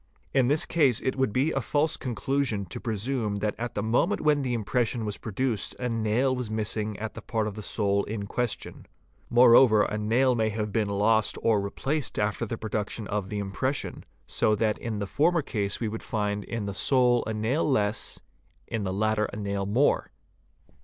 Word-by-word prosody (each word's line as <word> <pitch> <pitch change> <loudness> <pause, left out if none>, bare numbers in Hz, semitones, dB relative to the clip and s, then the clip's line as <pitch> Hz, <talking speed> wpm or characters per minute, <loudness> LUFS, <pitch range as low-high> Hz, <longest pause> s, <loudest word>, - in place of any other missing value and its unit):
In 130 -3 +3
this 145 +3 +4
case 140 -9 +2
it 130 - -1
would 130 -4 +1
be 135 +8 +1
a 135 - -1
false 150 +5 +1
conclusion 125 -3 -1
to 85 - -7
presume 110 -1 -2
that 105 0 -1
at 120 +1 -4
the 105 - -1
moment 125 - +1
when 150 -1 +3
the 125 -3 -1
impression 115 +1 0
was 105 -1 -3
produced 115 +1 -1
a 125 -1 -1
nail 115 +4 +1
was 125 -3 -4
missing 110 -1 -2
at 110 +1 -5
the - - -8
part 110 -2 -1
of 105 - -3
the 105 - -7
sole 100 -1 +1
in 105 -1 -4
question. 120 +2 -3 0.4
Moreover, 120 -2 +7
a 105 - -2
nail 120 +5 +3
may 110 -2 +1
have 105 -1 -3
been 110 -3 +1
lost 105 +2 +2
or 110 -3 +3
replaced 135 +8 -3
after 105 +2 -1
the 115 - -4
production 110 0 -3
of 100 -2 -2
the 105 - -3
impression, 105 +8 -2 0.2
so 110 - +1
that 105 0 0
in 115 -3 -4
the 100 - -2
former 160 - +2
case 100 -6 -2
we 115 - -1
would 110 +1 -5
find 105 -2 -2
in 115 -3 -4
the 100 - -3
sole 125 +2 +3
a 110 - -2
nail 115 +9 0
less, 105 -7 0 0.5
in 110 -2 -3
the 95 - -2
latter 110 +2 +1
a - - -7
nail 100 -1 -2
more. 125 +8 +2
110 Hz, 195 wpm, -27 LUFS, 105-125 Hz, 0.5 s, Moreover